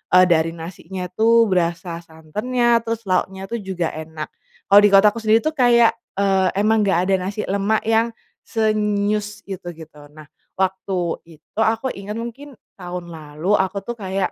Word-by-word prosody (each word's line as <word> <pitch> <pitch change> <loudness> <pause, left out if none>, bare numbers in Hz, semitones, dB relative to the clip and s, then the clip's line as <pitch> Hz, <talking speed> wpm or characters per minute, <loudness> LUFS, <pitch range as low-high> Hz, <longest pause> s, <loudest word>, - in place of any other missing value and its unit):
eee 185 - +8
dari 165 0 +2
nasinya 180 +2 -7
tuh 230 +4 +4
berasa 170 -1 -1
santannya 210 +10 0
terus 230 0 -4
lauknya 190 0 -1
tuh 235 - -2
juga 185 -4 -3
enak, 155 0 -7 0.4
kalau 200 - +9
di - - +8
kotaku 205 +3 +6
sendiri 220 0 +3
tuh 310 - +1
kayak, 240 -2 +5 0.2
eee, 195 -1 +2
emang 215 0 +3
gak 185 0 +1
ada 195 - +4
nasi 210 +1 -3
lemak 200 +2 0
yang, 225 +1 +1 0.3
se 220 -1 +1
nyus 210 0 -1
itu 190 -3 -8
gitu 150 -2 -13
nah 155 0 -12 0.3
waktu 190 0 -1 0.4
itu 155 +7 -11
aku 225 +4 +1
inget 200 +2 -7
mungkin 235 +4 -7 0.2
tahun 175 -1 -6
lalu 155 +3 -4
aku 190 +1 -1
tuh 240 +3 -6
kayak, 190 -1 -2
195 Hz, 165 wpm, -21 LUFS, 175-220 Hz, 0.4 s, kalau